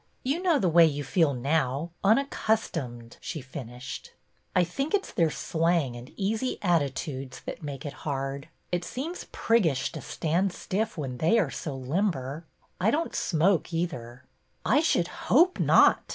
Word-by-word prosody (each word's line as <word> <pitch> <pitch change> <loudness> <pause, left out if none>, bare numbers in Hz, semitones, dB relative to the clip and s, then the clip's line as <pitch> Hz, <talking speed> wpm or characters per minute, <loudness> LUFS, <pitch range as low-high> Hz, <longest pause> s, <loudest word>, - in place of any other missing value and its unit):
You 280 +7 0
know 350 -5 +3
the 195 - +1
way 170 0 +7
you 145 -1 -2
feel 145 0 +2
now, 140 +3 0
unaccustomed," 195 - 0
she 170 -2 -4
finished. 125 -1 -8 0.4
r 180 - +5
think 275 - -1
it 395 - 0
's - - -10
their 165 -2 +2
slang 160 -5 0
and 120 +2 -10
easy 220 +5 -1
attitudes 140 -5 -1
that - - -7
make 140 -2 -6
it 145 - -4
hard. 135 0 -3 0.2
It 175 0 0
seems 300 - -5
priggish 165 - +2
to - - -7
stand 175 +4 0
stiff 215 +3 -2
when 130 -5 -4
they 165 +9 +4
are 175 -11 +2
so 145 -4 -5
limber. 145 0 -1 0.3
I 190 +4 +3
don't 315 +7 0
smoke 175 +2 +2
either." 130 -8 -3 0.2
'' - - -43
I 265 +7 +4
should 300 - +2 0.2
hope 345 +9 +5
not! - - +6
165 Hz, 160 wpm, -28 LUFS, 135-205 Hz, 0.4 s, way